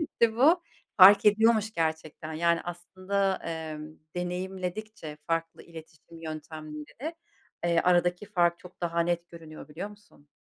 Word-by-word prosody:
etti 230 -7 +1
bu. 320 +8 +5 0.3
Fark 200 +2 +9
ediyormuş 220 +1 +4
gerçekten, 160 -2 -3
yani, 170 +1 +2
aslında, 185 +3 -2 0.4
ımm 155 +1 -10 0.2
deneyimledikçe 180 0 -5
farklı 165 0 -2
iletişim 165 0 -13
yöntemlerini, 155 - -7 0.5
ııı, 170 -1 +3
aradaki 175 +2 +2
fark 175 -4 +2
çok 180 0 -15
daha 170 -1 0
net 170 0 -1
görünüyor, 160 -3 -11
biliyor 175 +7 -6
musun? 205 -8 -20
175 Hz, 120 wpm, -28 LUFS, 160-200 Hz, 0.5 s, Fark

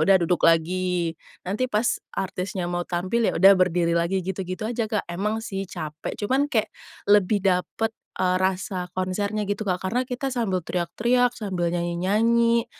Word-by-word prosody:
udah 195 +2 +6
duduk 175 +1 +1
lagi, 170 +1 +1 0.3
nanti 215 +7 0
pas 215 +2 +1 0.2
artisnya 185 -1 -3
mau 175 0 -1
tampil, 185 +6 0
ya - - +1
udah 195 +3 +8
berdiri 175 -2 +2
lagi, 175 +3 0
gitu-gitu 185 +1 -4
aja 235 -2 -1
Kak. 210 - 0
Emang 210 +5 -1
sih, 195 -3 -3
capek, 155 -3 -6
cuman 265 +7 +2
kayak 220 -6 0 0.4
lebih 205 0 +4
dapat, 195 +4 +1 0.3
eee, 185 0 +2
rasa 185 -1 -1
konsernya 200 +3 -1
gitu, 205 +1 -1
Kak. 180 -2 -1
Karena, 245 +2 +1
kita 255 +1 -2
sambil 190 -7 0
teriak-teriak, 240 +9 +1
sambil 190 -5 -2
nyanyi-nyanyi, 225 +7 +2
190 Hz, 155 wpm, -24 LUFS, 180-220 Hz, 0.4 s, udah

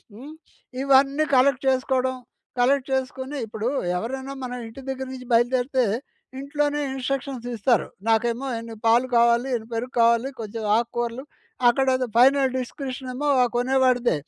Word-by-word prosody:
హ్మ్. 270 +8 -10 0.5
ఇవన్నీ 275 +2 +4
కలెక్ట్ 260 +1 +3
చేసుకోవడం. 260 0 +1 0.4
కలెక్ట్ 265 +2 +2
చేసుకొని, 265 +1 -3
ఇప్పుడు 220 +2 -3 0.3
ఎవరైనా 265 +7 -4
మన 250 -1 -5
ఇంటి 225 +4 -10
దగ్గర 265 0 -4
నుంచి 255 -1 -9
బయలుదేరితే 250 +2 +2 0.6
ఇంట్లోనే 290 +1 -1
ఇన్స్ట్రక్షన్స్ 265 -1 -4
ఇస్తారు. 230 +1 +2 0.2
నాకేమో 235 +4 +1
ఇన్ని 230 0 -8
పాలు 235 +3 +4
కావాలి, 235 +2 +3
ఇన్ని 225 0 -8
పెరుగు 245 +3 -4
కావాలి. 235 +2 +3
కొంచెం 220 0 -6
ఆకుకూరలు. 235 +2 -3 0.4
అక్కడ 265 +3 +2
ఏదో 255 -1 -2
ఫైనల్ 270 +1 +5
డిస్క్రిప్షన్ 255 0 -6
ఏమో 290 +3 -2 0.3
కొనేవాడిదే. 250 - +2
255 Hz, 130 wpm, -24 LUFS, 235-270 Hz, 0.6 s, ఫైనల్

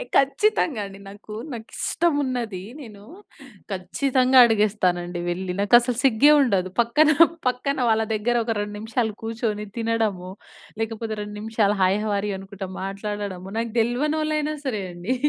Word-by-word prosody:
ఏయ్ - - -7
ఖచ్చితంగా 275 - +2
అండి. 195 0 -11
నాకు, 205 +2 -12 0.2
నాకిష్టమున్నది 250 - -2 0.2
నేను 210 -6 -11 0.7
ఖచ్చితంగా 255 +7 +2
అడిగేస్తానండి 185 -6 +1
వెళ్ళి, 180 +1 -2
నాకు 205 +4 +2
అసలు 240 0 -2
సిగ్గే 270 +3 +5
ఉండదు. 195 -8 +1
పక్కన, 290 +7 +3 0.4
పక్కన 255 +3 0
వాళ్ళ 220 0 +3
దగ్గర 220 +3 0
ఒక 225 0 -1
2 205 0 -4
నిమిషాలు 220 +1 -1
కూర్చొని 225 -2 -3
తినడము 225 -5 -1 0.5
లేకపోతే, 225 0 -3
2 210 0 -6
నిమిషాలు 215 -1 +1
హాయ్ 185 +1 +4
హౌ 215 - -2
ఆర్ 200 - -2
యు - - -2
అనుకుంటా 195 0 -8
మాట్లాడడము, 195 -1 -5
నాకు 230 0 -2
దెల్వనోలాయిన 300 +6 0
సరే 225 -7 -2
అండి. 175 +9 -2
220 Hz, 135 wpm, -23 LUFS, 200-250 Hz, 0.7 s, సిగ్గే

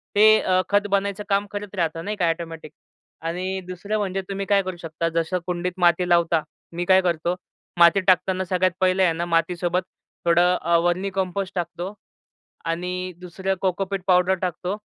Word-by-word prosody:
ते 215 +1 +7
अ, 185 0 +2
खत 205 0 +2
बनायचं 200 +1 0
काम 200 0 +2
करत 205 -1 -6
राहत 165 -3 -1
नाही 210 +3 -3
का 170 -2 +2
ऑटोमॅटिक. 165 -2 -5 0.5
आणि 185 +3 -3
दुसरं 200 +4 -3
म्हणजे 195 -2 -1
तुम्ही 195 0 -3
काय 200 -1 +3
करू 185 -1 -5
शकता. 165 0 -3
जसं 165 +2 0
कुंडीत 180 0 -1
माती 175 +1 +3
लावता, 170 -2 +3 0.3
मी 175 +1 -2
काय 190 +1 +5
करतो 175 0 0 0.4
माती 170 +3 +7
टाकताना 185 0 +3
सगळ्यात 185 0 +1
पहिलं 185 0 +3
आहे 170 - +3
ना, 170 +1 -2
मातीसोबत 175 +1 0 0.4
थोडं 175 +1 +4
अ, 170 +1 +3
वर्मी 180 +3 0
कंपोस्ट 190 0 -3
टाकतो 175 +2 -4 0.7
आणि 180 +2 -3
दुसरं 190 +2 -3
कोकोपीट 190 +1 -1
पावडर 180 0 +4
टाकतो 180 +2 -2
180 Hz, 165 wpm, -23 LUFS, 170-190 Hz, 0.7 s, ते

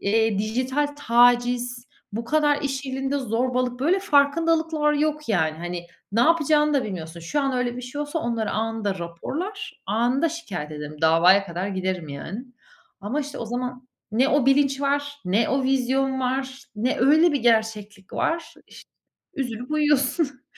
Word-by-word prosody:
eee, 220 0 +2
dijital 255 +7 0
taciz, 245 0 +2 0.3
bu 225 +3 -3
kadar 295 +1 +2
iş 275 0 -2
yerinde 270 +2 -2
zorbalık, 250 +1 -1
böyle 340 +8 +3
farkındalıklar 320 -1 +2
yok 300 0 -1
yani. 160 -7 +1
Hani, 175 0 -5 0.3
ne 225 - +2
yapacağını 300 0 +3
da 275 - +2
bilmiyorsun. 170 -4 -6
Şu 170 - -1
an 275 -1 0
öyle 250 -1 -1
bir 250 - -6
şey 255 +4 -6
olsa 295 +2 -2
onları 230 -6 -2
anında 220 -3 -2
raporlar, 305 - -6
anında 240 - +1
şikâyet 200 - -6
ederim; 150 0 -7
davaya 170 +5 +5
kadar 180 +2 -3
giderim 185 -4 -3
yani. 165 - -6 0.6
Ama, 220 +9 -2
işte, 290 0 -6
o - - -4
zaman 250 +2 -5 0.2
ne 250 +5 +3
o 290 -4 +2
bilinç 275 0 +3
var, 285 +1 -1
ne 205 +5 +2
o 270 +1 +1
vizyon 265 0 +1
var, 265 +1 -2
ne 240 +5 0
öyle 310 +6 +5
bir 285 - 0
gerçeklik 220 -4 0
var. 330 0 -2
İşte, - - -15 0.4
üzülüp 245 -1 -4
uyuyorsun. 290 -1 +1
255 Hz, 155 wpm, -24 LUFS, 215-285 Hz, 0.6 s, davaya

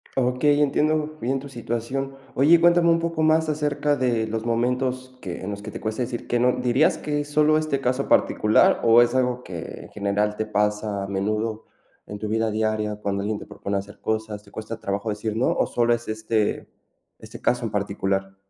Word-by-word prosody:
Okey, 135 +3 +2
entiendo 155 +2 +1
bien 135 +1 -1
tu 140 - -9
situación. 130 +2 -4 0.2
Oye, 155 +6 +6
cuéntame 170 0 +5
un 165 0 +4
poco 165 -1 -2
más 155 0 +3
acerca 150 -1 0
de 120 -4 +1
los 110 +1 -3
momentos, 125 +2 -1
que 90 -2 -6
en 95 - -5
los 100 0 -6
que 105 +1 -7
te - - -8
cuesta 110 +3 -2
decir 120 0 -5
que 120 - +1
no, 125 +1 +3
¿dirías 125 +5 +2
que 150 -1 -2
es 145 - -8
solo 150 +1 +4
este 155 -3 -1
caso 130 +1 0
particular?, 105 0 +4
o 115 +1 +7
es 120 - +2
algo 125 -1 0
que, 85 -3 -7
en - - -13
general 105 +1 -1
te 110 - -1
pasa, 105 -1 -1
a - - -5
menudo, 105 +3 -2 0.4
en 105 - -6
tu 110 - -4
vida 110 +1 +1
diaria, 110 -1 -1
cuando 100 -1 -1
alguien 105 0 -2
te - - -9
propone 100 - -5
hacer 100 +1 -7
cosas, 110 -1 -3
¿te 100 - -19
cuesta 110 +1 -6
trabajo 100 +3 -3
decir 105 +1 -3
no? 115 - +1
¿O - - +1
solo 120 0 +1
es 120 0 -3
este 110 0 -1 0.5
este - - -11
caso 120 0 +1
en 110 - -3
particular? 95 -1 -2
115 Hz, 205 wpm, -24 LUFS, 105-135 Hz, 0.5 s, o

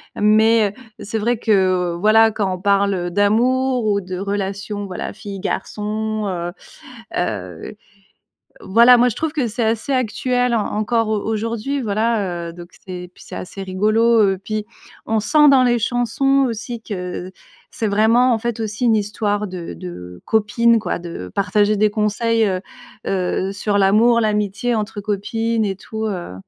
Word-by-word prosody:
mais 215 0 +4 0.3
c'est 220 +2 -4
vrai 235 +2 0
que, 225 - -1 0.4
heu, - - -5
voilà 220 +2 +5
quand 200 -3 -1
on 180 - -11
parle 200 -3 +1
d'amour 245 +6 +2
ou 205 -1 +2
de 185 -1 -6
relation 200 +1 -3
voilà 185 -2 -5
fille 200 -2 -8
garçon, 215 0 -3
heu, 175 -2 -3 0.7
heu, 95 - -4 0.9
voilà 235 +5 +6
moi 245 +1 +4
je 220 - -5
trouve 315 -1 -2
que 285 -6 -1
c'est 230 +2 -2
assez 225 +5 -1
actuel 250 0 0
en 220 -3 +1
encore 225 +1 0
au 215 -1 +1
aujourd'hui 230 +5 -2
voilà, 205 -6 -1
heu, - - -9
donc 175 0 -11 0.2
c'est 180 -1 -7
puis - - -15
c'est - - -9
assez 195 +1 -7
rigolo. 215 +5 +2
Heu, 195 -2 +2
puis 215 -1 -3 0.4
on 220 0 +1
sent 295 +7 +4
dans 265 -2 +6
les 240 -1 +2
chansons 245 +4 +1
aussi 230 +1 -5
que 180 -3 -5 0.4
c'est 220 - -2
vraiment 230 +5 +3
en 225 - +1
fait 235 0 -3
aussi 220 +2 -2
une 225 - +4
histoire 210 0 -1
de 180 - -7
de 90 +1 -9
copines 230 +2 +3
quoi 220 - -2
de 170 - -7
partager 205 +2 +2
des 210 +1 +3
conseils, 220 +2 +1
heu, 185 -2 -1 0.5
heu, 190 0 -1
sur 200 +1 0
l'amour, 220 +5 +4
l'amitié 210 +2 0
entre 210 -1 -3
copines 220 +2 -1
et 195 -1 -2
tout, 220 +2 -5
heu. 180 - -4
215 Hz, 165 wpm, -20 LUFS, 195-230 Hz, 0.9 s, voilà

